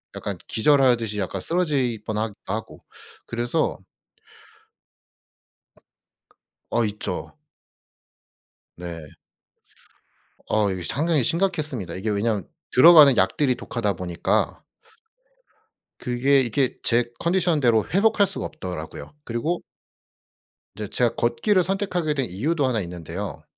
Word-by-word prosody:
약간 - - -4
기절하듯이 120 -4 +3
약간 95 0 -3
쓰러질 140 - 0
뻔하기도 110 -2 -4
하고. 110 - -6 0.4
그래서 120 0 -1 2.9
어. 120 - +1
있죠. 105 0 -4 1.4
네. 85 -3 -8 1.4
어. 105 -2 +2
이게 95 -1 -4
상당히 150 - +1
심각했습니다. 155 - -1
이게 105 +4 -3
왜냐하면 105 -1 -1 0.3
들어가는 145 -2 +8
약들이 125 +8 +2
독하다 115 -4 -2
보니까 90 0 -1 1.4
그게 130 +3 +2
이게 130 +1 0
제 120 0 +2
컨디션 175 -2 +1
대로 115 -5 +3
회복할 205 0 +4
수가 195 - -4
없더라고요. 90 - -7
그리고 150 +9 -2 1.1
이제 105 -1 -5
제가 120 +2 +1
걷기를 120 - +2
선택하게 180 -4 -1
된 135 - 0
이유도 140 - 0
하나 115 -5 0
있는데요. 90 +2 -6
120 Hz, 255 characters per minute, -23 LUFS, 105-150 Hz, 2.9 s, 들어가는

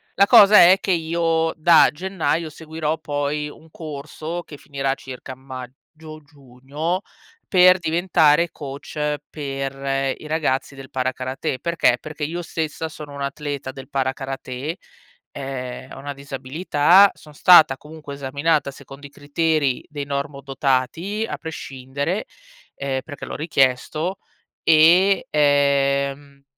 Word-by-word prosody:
La 200 +1 +5
cosa 210 -2 +8
è 180 +2 +8
che 195 - -1
io, 165 -1 +1
da 165 +1 +6
gennaio, 170 -1 -2
seguirò 160 0 -4
poi 145 0 -2
un 160 +2 -16
corso, 155 +2 -7
che 150 - -12
finirà 135 -1 -2
circa 130 -1 -9
a - - -12
maggio, 135 +5 -11
giugno, 145 +5 -5 0.5
per 185 0 +6
diventare 165 -1 +2
coach 150 +1 -4
per 135 -1 -3
i 155 - -11
ragazzi 145 -3 -1
del 135 -1 -11
para-karatè. 130 0 -3
Perché? 165 -7 +2
Perché 155 -1 -8
io 170 +4 -3
stessa 160 -1 -4
sono 150 -2 -10
un'atleta 140 -1 -4
del 130 0 -11
para-karatè. 135 +2 -3 0.6
Ehm, 130 -2 -6
ho - - -10
una 145 +1 -6
disabilità, 145 +7 +3
son 150 - -16
stata 155 -3 +6
comunque 150 0 -10
esaminata 140 +3 0
secondo 140 +1 -12
i - - -19
criteri 145 -1 0
dei 145 -2 -5
normodotati, 140 - -2
a - - -5
prescindere, 145 +3 -4 0.5
ehm, 135 -1 -3
perché 145 -2 -9
l'ho - - -6
richiesto. 155 +4 0 0.4
E 170 +5 +5
ehm, 140 -1 +1
145 Hz, 120 wpm, -22 LUFS, 135-160 Hz, 0.6 s, cosa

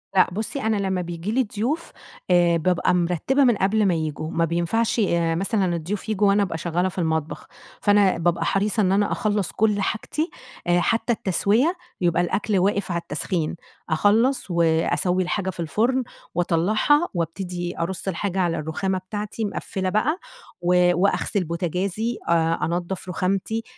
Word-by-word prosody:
لأ 185 - +5
بُصّي، 220 +8 -3
أنا 220 -1 +1
لمّا 190 -2 -1
بييجي 175 +3 -4
لي 260 +2 +2
ضيوف، 285 +11 -2 0.4
آآ 175 -1 +4
بابقى 180 +2 +1
مرتِّبة 180 - +2
من 240 -4 +4
قبل 205 +3 +2
ما 185 - +3
ييجوا. 155 -1 -3
ما 165 - +1
بينفعش 175 +8 0
آآ 170 -5 +1
مثلًا 190 -1 0
الضيوف 190 +6 -4
ييجوا 210 -1 +2
وأنا 200 +1 +4
أبقى 170 -4 -3
شغّالة 175 +2 0
في 185 - -13
المطبخ. 160 -2 -2 0.3
فأنا 205 -3 +4
بابقى 170 0 0
حريصة 210 +2 +1
إن 185 -1 +2
أنا 205 +1 +2
أخلّص 205 -3 0
كل 210 -2 +1
حاجتي 305 - -2 0.4
آآ 175 0 +4
حتّى 230 +5 +1
التسويّة، 220 - +1 0.3
يبقى 175 -1 +2
الأكل 200 +3 0
واقف 200 0 0
على 170 - -1
التسخين. 160 +2 -2 0.3
أخلّص 210 - +2
وأسوّي 170 +2 +2
الحاجة 190 +1 -2
في 180 - -8
الفُرن، 235 +10 +1 0.3
وأطلّعها 210 - +2
وأبتدي 175 0 -4
أرُص 170 +2 -3
الحاجة 190 +1 -2
على 175 -2 +1
الرخامة 185 +5 -2
بتاعتي 210 +3 -4
مقفّلة 190 -2 -3
بقى، 245 - +1 0.4
و 180 0 +4
وأغسِل 200 0 +1
بوتاجازي، 180 +7 -2
أ - - +3 0.3
أنضّف 175 +2 -3
رُخامتي، 195 +5 -1
185 Hz, 155 wpm, -23 LUFS, 170-210 Hz, 0.4 s, لأ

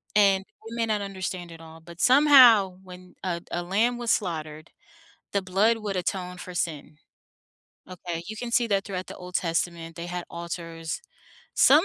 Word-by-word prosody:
And, 195 -2 +4 0.2
you 230 - -7
may 230 -1 +1
not 215 -2 0
understand 185 -3 -5
it 165 - -11
all, 160 0 -12
but 170 +1 -13
somehow 250 -9 +7
when 180 -1 -13
a 175 -2 -2
a 175 - -2
lamb 220 +7 +1
was 240 -1 0
slaughtered, 155 -4 -2 0.6
the 200 - +2
blood 195 +5 +2
would 205 -3 -3
atone 180 0 -3
for 180 0 -8
sin, 155 -3 -3 0.9
okay, 175 -2 -5
you 220 - -6
can 240 +2 -5
see 240 0 +3
that 200 -2 +1
throughout 185 -2 -5
the - - -8
Old 180 0 -10
Testament, 165 -1 -1
they 170 0 -5
had 175 0 -4
altars, 165 -1 -5 0.5
some, 300 +5 +6
185 Hz, 170 wpm, -26 LUFS, 170-210 Hz, 0.9 s, somehow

